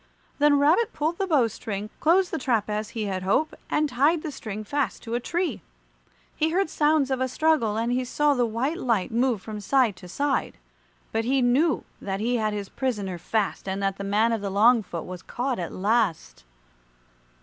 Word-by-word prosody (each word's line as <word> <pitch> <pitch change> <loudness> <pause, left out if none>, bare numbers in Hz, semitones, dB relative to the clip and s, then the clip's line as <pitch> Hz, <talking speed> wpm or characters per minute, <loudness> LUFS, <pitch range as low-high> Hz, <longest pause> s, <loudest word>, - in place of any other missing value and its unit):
Then 290 0 +5
Rabbit 320 +11 +3
pulled 315 +3 -1
the 390 - 0
bow 285 -9 +3
string, 210 -1 -6
closed 355 +3 +3
the 325 - -2
trap 230 -5 0
as 210 0 -2
he 220 - -1
had 190 -2 -2
hoped, 200 +12 +1 0.2
and 305 0 +2
tied 290 +5 +2
the 310 - -4
string 215 -5 -6
fast 285 +5 -2
to 230 - -6
a 240 - +1
tree. 345 +8 -2 0.7
He 315 +1 +1
heard 360 0 0
sounds 295 -2 +2
of 260 -1 0
a 260 - +2
struggle, 255 -6 +1
and 230 +2 0
he 255 +1 +1
saw 295 +4 +2
the 245 -3 +1
white 255 +9 -1
light 230 - 0
move 235 -3 +1
from 215 -1 -6
side 235 0 +2
to 180 - -11
side, 275 - -1 0.5
but 225 0 0
he 260 +1 +2
knew 270 +5 +2 0.2
that 195 -1 -3
he 240 +3 0
had 215 -1 0
his 205 -1 -4
prisoner 205 -9 -3
fast 210 +2 -2
and 190 +1 -2
that 195 -1 0
the - - -3
man 210 +4 +2
of 225 -2 -1
the 200 - -3
long 225 +5 +5
foot 170 -5 -6
was 180 0 -7
caught 250 -1 -3
at 170 - -4
last. 185 - 0
235 Hz, 205 wpm, -25 LUFS, 205-290 Hz, 0.7 s, Then